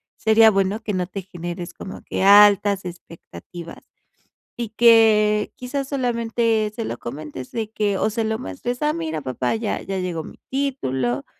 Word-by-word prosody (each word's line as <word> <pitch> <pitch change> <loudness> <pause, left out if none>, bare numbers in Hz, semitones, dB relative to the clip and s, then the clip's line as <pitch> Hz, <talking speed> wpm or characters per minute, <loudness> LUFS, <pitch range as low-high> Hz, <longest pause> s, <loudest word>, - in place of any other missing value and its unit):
sería 220 0 +5
bueno 195 +1 0
que 210 - -3
no 180 -2 -1
te 195 +1 -6
generes 175 -1 -7
como 190 - -9
que - - -4
altas 200 -1 +6
expectativas, 170 -1 -10 0.8
y 235 -2 -3
que 215 -2 +4
quizás 270 +2 -4
solamente, 230 -4 0
se 230 - -4
lo 120 - -4
comentes 140 0 -7
de 220 -2 -3
que 205 -3 0
o 215 - +1
se 225 +1 -2
lo 220 0 -2
muestres, 245 -1 -5
ah, 300 0 +1
mira 160 -1 -3
papá 130 - -2
ya 220 -1 -2
ya 195 -1 -4
llegó 175 -3 -3
mi - - -12
título, 135 - -2
210 Hz, 165 wpm, -22 LUFS, 175-225 Hz, 0.8 s, altas